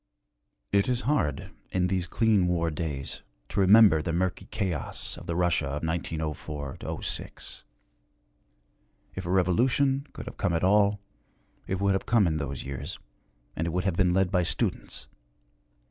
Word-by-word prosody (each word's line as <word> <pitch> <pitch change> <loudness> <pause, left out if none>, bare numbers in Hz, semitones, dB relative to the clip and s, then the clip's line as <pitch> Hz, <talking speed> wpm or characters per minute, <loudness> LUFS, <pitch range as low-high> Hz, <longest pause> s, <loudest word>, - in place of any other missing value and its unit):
It 100 +3 +3
is 125 -1 +1
hard, 125 - 0 0.2
in 90 -1 +1
these 90 -1 0
clean 105 -1 +3
war 85 -2 +1
days, 75 -3 -4 0.3
to - - -2
remember 100 -4 +7
the 85 - -2
murky 90 +2 -1
chaos 95 -9 -3
of - - -11
the 85 - -2
Russia 85 -4 +1
of 75 +2 -4
1904 80 -3 -3 0.3
06. - - -5 1.5
If - - -5
a - - -3
revolution 130 - +2
could - - -8
have - - -9
come 100 -5 0
at 85 - 0
all, 100 +1 +4 0.7
it 95 - -1
would 100 0 +2
have 95 - -2
come 115 -4 +4
in 80 -2 +1
those 70 -3 -4
years, 70 -1 -5 0.6
and 80 - -1
it - - 0
would 90 +2 -1
have 95 -4 0
been 90 0 +3
led 95 0 +2
by 90 -2 +3
students. 85 - -2
90 Hz, 160 wpm, -28 LUFS, 80-100 Hz, 1.5 s, remember